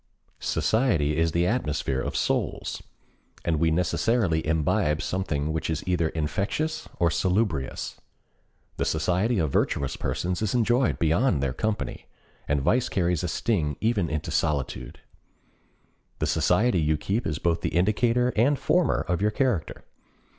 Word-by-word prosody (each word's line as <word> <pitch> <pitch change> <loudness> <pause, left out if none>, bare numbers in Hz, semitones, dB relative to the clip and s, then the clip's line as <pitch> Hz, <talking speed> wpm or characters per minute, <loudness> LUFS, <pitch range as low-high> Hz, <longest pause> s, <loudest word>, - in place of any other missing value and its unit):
Society 90 - +1
is 80 +1 +2
the 85 +2 +1
atmosphere 75 - -1
of - - -4
souls, - - -1 0.6
and 80 -2 +1
we 80 0 +3
necessarily 90 +1 +1
imbibe 75 -1 +1
something 80 -5 -2
which 80 - -2
is 80 0 -3
either 85 -3 +1
infectious 100 - -2
or 85 -1 +2
salubrious. 90 -4 -1 0.8
The - - 0
society 90 +9 +1
of 80 -6 0
virtuous 70 0 0
persons 90 +2 -2
is 110 +1 0
enjoyed 120 +2 +2
beyond 85 - +2
their 65 -2 0
company, 110 +9 -3 0.4
and 70 0 +1
vice 125 - +2
carries 90 -3 0
a - - 0
sting 75 - -1
even 110 -7 +1
into 75 0 -3
solitude. 70 -5 -2 1.2
The - - -1
society 115 -6 +2
you 75 0 +1
keep 100 +10 -2
is 75 -2 -2
both 85 0 0
the - - 0
indicator 115 +6 +2
and 140 +6 +3
former 180 +5 +2
of 90 +1 0
your 105 - +3
character. 110 - -1
85 Hz, 140 wpm, -26 LUFS, 80-110 Hz, 1.2 s, we